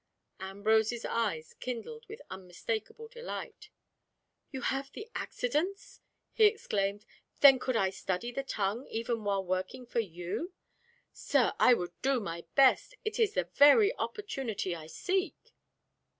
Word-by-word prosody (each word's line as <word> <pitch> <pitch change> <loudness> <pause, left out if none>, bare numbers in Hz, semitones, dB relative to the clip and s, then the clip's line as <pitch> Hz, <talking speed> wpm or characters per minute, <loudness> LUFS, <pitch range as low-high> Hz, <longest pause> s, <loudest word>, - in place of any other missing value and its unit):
Ambrose's 220 +4 +1
eyes 195 -9 -2
kindled 455 - -6
with 435 - -10
unmistakable 195 - -5
delight. 475 -2 -8 0.8
"You 265 -2 -6
have 270 +2 -2
the 430 - -8
accidence!" 320 +11 -3 0.3
he 440 - +5
exclaimed. 205 - 0 0.4
"Then 270 -2 +9
could 255 -1 -1
I 195 -4 +2
study 190 +4 -3
the 275 - -2
tongue 220 -1 -2
even 230 0 -2
while 200 -2 0
working 185 +7 -3
for 235 - -2
you! 180 - -4 0.6
Sir, - - +1
I 250 - +7
would 175 -5 -4
do 270 -1 +2
my 170 -5 -6
best! 275 - +4
It 435 - -2
is 430 -2 +2
the - - +2
very 400 +11 +6
opportunity 265 - -3
I 155 -2 -9
seek." 375 - -2
235 Hz, 135 wpm, -31 LUFS, -, 0.8 s, Then